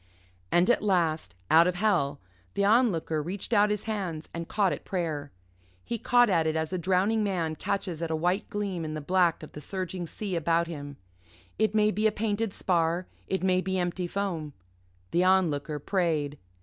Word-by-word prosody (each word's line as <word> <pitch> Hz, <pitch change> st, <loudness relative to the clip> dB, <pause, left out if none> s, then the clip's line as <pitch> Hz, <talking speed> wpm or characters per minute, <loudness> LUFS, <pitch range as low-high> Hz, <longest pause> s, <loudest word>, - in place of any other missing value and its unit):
And 175 Hz, +2 st, +4 dB
at -, -, +2 dB
last, 165 Hz, -, 0 dB, 0.2 s
out 165 Hz, +2 st, +7 dB
of 180 Hz, -, 0 dB
hell, 175 Hz, -8 st, +1 dB, 0.4 s
the 200 Hz, -, +2 dB
Onlooker 200 Hz, -9 st, +2 dB
reached 185 Hz, +8 st, -4 dB
out 210 Hz, -1 st, +5 dB
his 210 Hz, -1 st, -1 dB
hands 185 Hz, -8 st, -4 dB
and 170 Hz, 0 st, -5 dB
caught 200 Hz, -3 st, +1 dB
at -, -, -7 dB
prayer. 155 Hz, -6 st, -3 dB, 0.5 s
He 235 Hz, -, -3 dB
caught 245 Hz, +1 st, +4 dB
at 165 Hz, -6 st, +2 dB
it 155 Hz, -, 0 dB
as 160 Hz, +2 st, -2 dB
a 185 Hz, -, -1 dB
drowning 190 Hz, +5 st, +2 dB
man 170 Hz, -6 st, -1 dB
catches 180 Hz, -1 st, -3 dB
at 165 Hz, -, -2 dB
a 160 Hz, -, 0 dB
white 180 Hz, +5 st, 0 dB
gleam 200 Hz, -6 st, -3 dB
in 155 Hz, -1 st, -4 dB
the -, -, -3 dB
black 175 Hz, +1 st, +2 dB
of 155 Hz, -, -9 dB
the 150 Hz, -, -9 dB
surging 185 Hz, +1 st, -4 dB
sea 195 Hz, +3 st, -4 dB
about 170 Hz, +1 st, +2 dB
him 145 Hz, -4 st, -7 dB, 0.6 s
it 220 Hz, 0 st, +2 dB
may 215 Hz, 0 st, +4 dB
be 215 Hz, +3 st, +2 dB
a -, -, +2 dB
painted 215 Hz, 0 st, -1 dB
spar, 170 Hz, -1 st, 0 dB, 0.2 s
it 190 Hz, -1 st, -1 dB
may 185 Hz, -1 st, +3 dB
be 190 Hz, 0 st, -1 dB
empty 175 Hz, 0 st, -1 dB
foam. 170 Hz, -6 st, -3 dB, 0.6 s
The 175 Hz, -, +3 dB
Onlooker 165 Hz, -6 st, +2 dB
prayed. 150 Hz, -3 st, -1 dB
180 Hz, 190 wpm, -28 LUFS, 160-200 Hz, 0.6 s, out